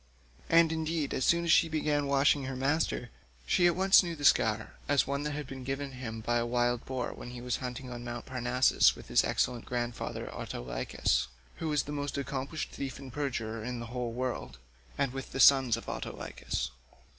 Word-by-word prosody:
And 165 -1 +6
indeed 160 -2 -1
as 130 - 0
soon 170 0 +3
as 170 - +2
she 165 - +5
began 150 -2 0
washing 140 0 +3
her 135 0 -4
master, 135 -2 0 0.3
she 175 - +4
at 175 - +2
once 190 +1 +6
knew 170 -3 -4
the 145 -2 -4
scar 110 -4 +3 0.2
as 145 -1 +4
one 140 0 -2
that 150 0 -3
had 150 0 -4
been 130 0 -8
given 135 +2 -3
him 115 -4 -6
by 120 +2 +1
a 120 - +1
wild 120 0 +1
boar 130 -2 -3
when - - -9
he 120 0 -7
was 125 +1 -2
hunting 125 0 -6
on 120 0 -6
Mt. 120 -1 -6
Parnassus 125 0 +3
with - - -12
his - - +4
excellent 120 -2 0
grandfather 120 -1 -3
Autolycus—who - - -3
was 150 -2 +2
the 145 - -7
most 145 -1 -3
accomplished 140 +2 -3
thief 135 -2 -5
and 135 -3 -10
perjurer 115 -6 -3
in 125 +1 -4
the 115 - -5
whole 125 -2 -2
world—and 65 - -4
with 135 0 -6
the - - -3
sons 135 -4 +6
of 115 - -9
Autolycus. - - -4
130 Hz, 190 wpm, -30 LUFS, 120-145 Hz, 0.3 s, And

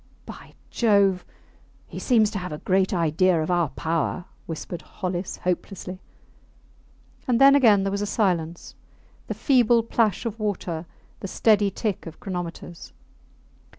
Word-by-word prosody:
By - - -12 0.2
Jove, 200 -5 +3 0.6
he - - -8
seems 220 -5 +3
to 205 - -3
have 180 -2 -6
a 150 - -4
great 190 +3 +1
idea 170 0 +2
of 155 +3 -1
our 175 -4 +2
power, 165 +4 -2 0.2
whispered 165 +1 -6
Hollis, 180 -2 -5
hopelessly. 185 +1 -4 1.3
And 245 -2 +2
then 275 0 +8
again 225 -8 +5
there 195 - -1
was 200 +1 -2
a 205 - -2
silence, 175 -6 -1 0.5
the - - -4
feeble 240 -4 +3
plash 225 -2 0
of 230 0 -4
water, 175 -6 -3 0.3
the - - -5
steady 205 0 +3
tick 200 -1 -3
of 165 - -10
chronometers. 175 -2 -7
190 Hz, 140 wpm, -24 LUFS, 175-215 Hz, 1.3 s, then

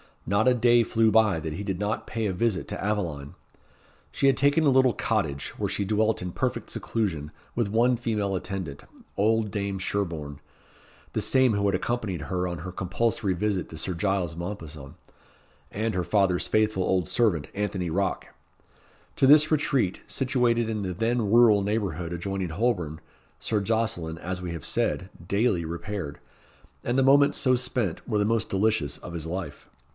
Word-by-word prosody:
Not 100 +5 +2
a 125 - +6
day 120 0 +5
flew 115 -1 +2
by 105 -6 +4
that 80 0 -4
he 100 - -5
did 95 -3 -2
not 105 +2 -2
pay 115 -1 -2
a 100 - 0
visit 100 0 0
to 100 - -5
Aveline. 85 -9 -2 0.8
She 140 - +1
had 135 - +4
taken 145 +3 +3
a 145 - +5
little 130 -2 +4
cottage, 80 -11 -1
where - - -1
she - - -1
dwelt 110 +2 +1
in 90 0 -4
perfect - - -2
seclusion, 80 -10 -2 0.2
with 120 -3 0
one 120 +3 +3
female 105 -5 -1
attendant, 90 -6 -5 0.3
old 110 +1 +2
Dame 100 -1 -2
Sherborne, 85 -7 -3 0.7
the - - 0
same 130 -3 +4
who 100 0 0
had 100 - +2
accompanied 110 -9 -2
her 90 +3 -2
on 85 -1 -4
her 90 +3 -6
compulsory 95 +2 -1
visit 95 0 -1
to 80 - -8
Sir 90 +4 -1
Giles 90 -2 -1
Mompesson, 80 -6 -7 0.7
and 110 +2 -2
her 90 - 0
father's 90 0 +1
faithful 110 -3 +1
old 90 -3 +1
servant, 100 -11 +1
Anthony 100 -4 -2
Rocke. 95 +3 -1 0.9
To 135 - +4
this 150 +2 +7
retreat, 135 - +1
situated 120 -4 +1
in 110 -2 -2
the 95 -2 -3
then 115 +2 0
rural 115 -2 +6
neighbourhood 95 -5 -2
adjoining 95 +1 -3
Holborn, 90 -5 -1 0.4
Sir 110 - 0
Jocelyn, 100 -6 -1
as 90 +2 -5
we 90 -1 -4
have 85 -4 -6
said, 95 - -1 0.2
daily 100 -4 +1
repaired, 85 -1 -5 0.6
and 120 +2 0
the 135 - +4
moments 140 +2 +5
so 130 -1 +3
spent 120 -7 -2
were 110 - 0
the 105 - +2
most 115 0 0
delicious 95 -8 +1
of 85 - -9
his 80 -1 -5
life. 90 +2 -6
100 Hz, 170 wpm, -26 LUFS, 90-115 Hz, 0.9 s, this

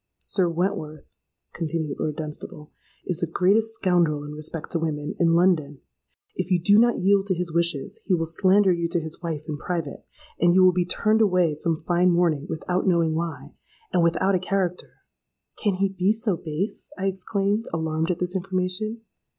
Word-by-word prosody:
—'Sir 185 -3 0
Wentworth,' 165 -3 -3 0.4
continued 160 -3 -3
Lord 155 -2 -2
Dunstable, 150 -1 -6 0.3
'is 180 -3 -1
the 170 - -1
greatest 210 +7 +2
scoundrel 170 -7 +1
in 145 - -8
respect 155 +1 -5
to 170 - 0
women, 150 -2 -3
in 165 -1 +3
London. 160 -6 +2 0.6
If 185 0 -3
you 180 -2 +3
do 205 +5 +5
not 240 +1 +4
yield 195 +1 +2
to 190 - +1
his 170 -1 -3
wishes, 170 -4 0
he 190 - +2
will 165 -1 -1
slander 190 +4 +4
you 170 -1 -1
to 170 +1 0
his 160 +1 -7
wife 160 -4 -4
in 150 -2 -4
private: 165 -4 -4 0.4
and 175 +1 +4
you 190 - +6
will 185 - +7
be 180 -1 +1
turned 215 +4 +1
away 180 -6 +3
some 160 +1 -2
fine 180 +1 +3
morning 170 -4 +1
without 180 +3 -2
knowing 170 -3 +2
why, 155 -4 -4 0.4
and 180 - +3
without 170 +4 +2
a 185 - +2
character.'—'Can 185 +2 -4
he 195 +1 +1
be 190 +2 +1
so 220 -3 0
base?' 165 +6 -5
I 195 - -3
exclaimed, 195 +3 -1
alarmed 160 0 -1
at 180 - 0
this 180 +1 -3
information. 190 +4 -2
175 Hz, 180 wpm, -24 LUFS, 160-190 Hz, 0.6 s, will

